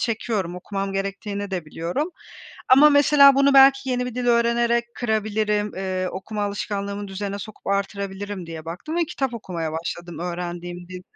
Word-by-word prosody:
çekiyorum, 215 -6 -2
okumam 195 +2 -4
gerektiğini 200 +1 -3
de 180 -3 -3
biliyorum 170 - -3 0.6
ama 285 +4 +8
mesela 285 -1 +7
bunu 275 0 +4
belki 270 0 +6
yeni 250 0 0
bir 250 - -6
dil 250 0 -2
öğrenerek 235 0 +3
kırabilirim, 215 -2 0
eee, 185 -1 -2
okuma 210 +3 -5
alışkanlığımı 200 0 -3
düzene 200 +1 -4
sokup 215 +1 -10
artırabilirim 200 -1 -3
diye 160 -1 -8
baktım 180 - -5
ve 345 - +2
kitap 270 -5 -3
okumaya 170 -7 -4
başladım 170 +1 -5
öğrendiğim 175 0 -5
dilde. 180 0 -8
200 Hz, 150 wpm, -23 LUFS, 185-235 Hz, 0.6 s, ama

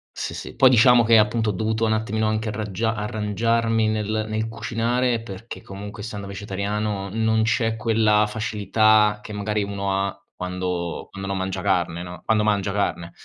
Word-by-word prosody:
Sì, - - -4
sì. - - -7
Poi 130 - +7
diciamo 120 0 +6
che, 115 0 +6
appunto, 110 +1 +2
ho - - 0
dovuto 110 +3 -1
un 110 - +2
attimino 110 0 0
anche 110 +1 -1
arraggia 110 +1 -2
arrangiarmi 110 +1 0
nel 110 0 -1
nel 110 +1 -2
cucinare 115 +1 -1
perché, 115 +1 -9
comunque, 105 +2 -8
essendo 105 -2 -6
vegetariano, 100 +1 -3
non 110 0 +2
c'è 115 -1 +1
quella 110 -1 +3
facilità 105 0 +2
che, 105 - -8
magari, 105 0 -1
uno 100 -1 -2
ha 100 - -7
quando 90 -1 -3
quando 95 0 -6
non 95 - -1
mangia 95 0 -3
carne, 90 -3 0
no 90 0 -9
quando 110 -1 +2
mangia 105 -2 +1
carne. 85 -4 -1
105 Hz, 170 wpm, -23 LUFS, 100-110 Hz, -, Poi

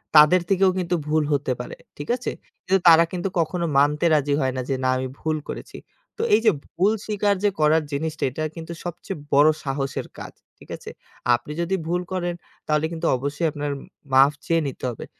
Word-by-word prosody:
তাদের 155 +4 +8
থেকেও 195 -1 +4
কিন্তু 180 -1 0
ভুল 155 0 +2
হতে 140 -2 0
পারে, 125 - -6 0.2
ঠিক 145 - -7
আছে? 250 - -4 0.3
কিন্তু 190 +1 +3
তারা 165 0 +9
কিন্তু 180 +1 -2
কখনো 170 +2 0
মানতে 150 +3 +3
রাজি 145 -1 +1
হয় 130 -1 0
না - - 0
যে 135 - +1
"না 130 - +2
আমি 130 0 -2
ভুল 155 -1 -1
করেছি।" - - -7 0.4
তো - - -3
এই - - +7
যে 220 - +7 0.2
ভুল 195 +4 +1
স্বীকার 205 -1 +1
যে 205 - +5
করার 155 +1 +4
জিনিসটা, 155 +2 -3
এটা 145 +5 -4
কিন্তু 165 +1 -7
সবচেয়ে 175 +1 -6 0.2
বড় 145 +2 +7
সাহসের 135 -1 -3
কাজ, - - -8 0.2
ঠিক - - -18
আছে? - - -10 0.5
আপনি 120 +5 -7
যদি 175 +3 0
ভুল 175 +2 0
করেন, 175 -1 -2 0.3
তাহলে 150 0 +2
কিন্তু 165 0 -4
অবশ্যই 145 +5 -1
আপনার 145 0 -3 0.4
মাফ 135 +2 +6
চেয়ে 165 -1 +2
নিতে 135 - -8
হবে। 120 - -7
155 Hz, 195 wpm, -23 LUFS, 145-175 Hz, 0.5 s, তারা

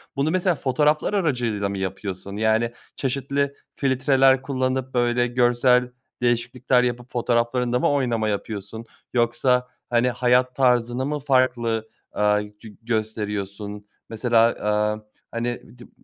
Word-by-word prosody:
Bunu 140 +3 +1
mesela 185 -1 +1
fotoğraflar 150 +6 +1
aracılığıyla 120 - 0
mı 100 - -4
yapıyorsun? 95 +1 -5
Yani, 110 +2 +2 0.2
çeşitli 140 +1 -1 0.2
filtreler 135 -1 +3
kullanıp, 130 -1 -2
böyle, 120 0 +2
görsel 125 0 +3 0.3
değişiklikler 125 +1 +1
yapıp, 125 0 -3
fotoğraflarında 120 +1 +1
mı - - +2
oynama 120 -6 0
yapıyorsun? 105 +2 -5 0.3
Yoksa, 125 +1 +2 0.2
hani, 120 +1 +2
hayat 125 +1 +2
tarzını 125 -1 +2
mı 150 +1 -2
farklı, 120 -5 +1 0.2
aaa, 105 0 +2
gö 105 +2 -11
gösteriyorsun? 105 -2 -4 0.2
Mesela, 115 +1 0
aaa, 105 -1 0 0.3
hani, 120 +1 -4
di 120 - -12
n - - -21
120 Hz, 120 wpm, -23 LUFS, 110-130 Hz, 0.3 s, filtreler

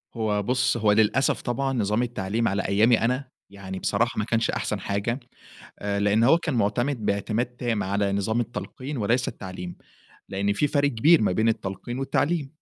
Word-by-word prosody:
هو 105 -2 0
بُص، 125 +1 +1
هو 105 -2 +3
للأسف 110 +5 +2
طبعًا 135 +2 -1
نظام 110 0 +1
التعليم 115 -1 -1
على 95 0 0
أيامي 110 +5 +3
أنا، 125 +3 0 0.2
يعني 95 -1 -7
بصراحة 115 +2 0
ما 105 - 0
كانش 115 0 0
أحسن - - -2
حاجة، 105 +6 -2 0.6
آآ 100 0 -2
لإنّ 105 +3 +3
هو 165 +7 +6
كان 160 -5 -3
مُعتمِد 115 +2 0
باعتماد 105 +4 0
تام 120 -3 -2
على 100 +1 0
نظام 110 +4 0
التلقين 130 +4 -5
وليس 120 +3 +1
التعليم، 95 -4 -7 0.5
لإن 100 +1 0
في 145 +8 +1
فرق 145 0 +2
كبير 145 +6 +4
ما 105 - +2
بين 110 +4 +2
التلقين 110 +4 -4
والتعليم. 140 +2 0
115 Hz, 170 wpm, -25 LUFS, 100-125 Hz, 0.6 s, هو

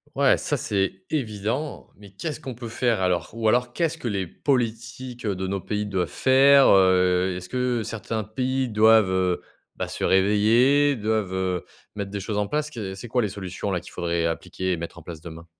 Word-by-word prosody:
Ouais, - - +4
ça, - - -1
c'est 95 -1 -1
évident. 120 +1 -3
Mais 100 -1 -14
qu'est-ce 150 - -5
qu'on 130 -2 -7
peut 120 +1 -7
faire 115 -2 0
alors? 90 -3 0
Ou 115 -1 -1
alors, 120 +1 +2
qu'est-ce 165 +1 0
que 125 - -5
les 100 -3 -1
politiques 120 - -3
de 95 -2 -2
nos 95 -1 -2
pays 105 0 -2
doivent 95 -3 -1
faire, 135 +1 +5
heu? 90 -1 +4
Est-ce 90 0 -8
que, 125 0 -1
certains 110 0 -4
pays 130 +4 -1
doivent, 110 -2 +5
heu, 90 -1 +1 0.3
bah, - - -3
se - - -5
réveiller, 115 +9 +4
doivent, 110 -3 -1
heu, 95 -2 -1 0.3
mettre 100 -1 -4
des 100 - -3
choses 105 +2 -3
en 105 - 0
place? 150 0 -2
Qu'est-ce 100 -6 -5
c'est 120 - -8
quoi 125 +2 +1
les 105 - -1
solutions 95 0 -5
là, 90 - 0
qu'il - - -13
faudrait 85 -1 -1
appliquer 90 +3 -2
et 90 - 0
mettre 85 +1 -7
en 85 - -11
place 80 -2 -9
demain? 85 0 -10
105 Hz, 200 wpm, -24 LUFS, 95-125 Hz, 0.3 s, faire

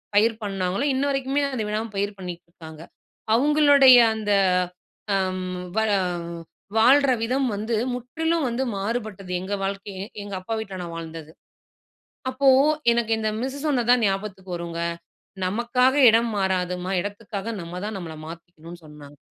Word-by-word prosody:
பயிர் 225 +2 +4
பண்ணாங்களோ 195 +2 -2
இன்ன 265 +2 0
வரைக்குமே 275 +1 0
அதை 225 - -2
விடாம 215 +2 -2
பயிர் 200 +1 -1
பண்ணிக்கிட்டு 180 -2 -8
இருக்காங்க. 160 -2 -12 0.5
அவங்களுடைய 285 -1 +6 0.2
அந்த 210 -1 -2 0.8
அம் 185 -1 -1 0.3
வ - - +5 1.0
வாழ்ற 270 +4 +5
விதம் 260 +3 0
வந்து 220 +3 -2 0.2
முற்றிலும் 320 +6 -1
வந்து 240 +2 -1
மாறுபட்டது. 200 -2 -4
எங்க 190 +2 -4
வாழ்க்கையே 195 0 -4 0.2
எங்க 200 -1 -8
அப்பா 185 +5 -5
வீட்ல 195 -4 -6
நான் 170 -1 -6
வாழ்ந்தது. 160 -1 -8 1.0
அப்போ 265 +2 0 0.4
எனக்கு 235 -1 0
இந்த 215 0 0
மிஸ்ஸு 265 +2 -4
சொன்னது 245 -5 0
தான் 245 -2 +4
ஞாபகத்துக்கு 195 -2 -3
வருங்க. 170 -1 -5 0.7
நமக்காக 240 +6 +2
இடம் 230 +1 +3
மாறாதும்மா! 180 -1 -1
இடத்துகாக 205 +2 -5
நம்மதான் 180 +5 -5
நம்மள 160 -3 -7
மாத்திகணும்னு 170 0 -11
சொன்னாங்க. 145 -1 -14
205 Hz, 130 wpm, -24 LUFS, 185-245 Hz, 1.0 s, அவங்களுடைய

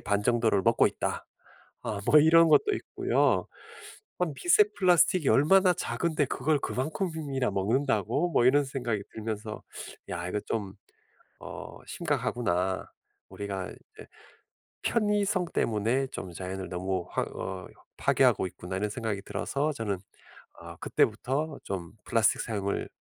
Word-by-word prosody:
반 100 0 0
정도를 115 -3 +2
먹고 - - +4
있다.' - - -4 0.6
아 105 -2 -3
뭐 150 - +8
이런 165 +2 +6
것도 415 - +5
있고요. - - +1 0.7
아 180 - +3
'미세 355 +4 +5
플라스틱이 180 -3 +4
얼마나 185 +5 +5
작은데 160 -4 -1
그걸 145 +3 0
그만큼이나 150 - -2
먹는다고?' 135 - +1
뭐 120 - +3
이런 145 +3 +5
생각이 120 -6 -2
들면서 110 -1 -5 0.5
'야 85 0 -4
이거 105 - -1
좀 100 -3 -4 0.6
어 - - -8
심각하구나. 95 -5 -1 0.4
우리가 100 -2 -5 1.1
편의성 205 -4 +1
때문에 115 +5 +1
좀 95 -8 -7
자연을 95 +1 -5
너무 95 0 -2
확 - - -1
어 95 -1 -5 0.3
파괴하고 - - +3
있구나.' 90 +1 -6
이런 105 +2 -1
생각이 110 -2 -3
들어서 145 +8 -2
저는 110 -7 -2 0.6
어 - - -9
그때부터 135 +7 0
좀 90 -4 -5
플라스틱 115 -2 +2
사용을 100 -3 -2
120 Hz, 280 characters per minute, -28 LUFS, 100-155 Hz, 1.1 s, 뭐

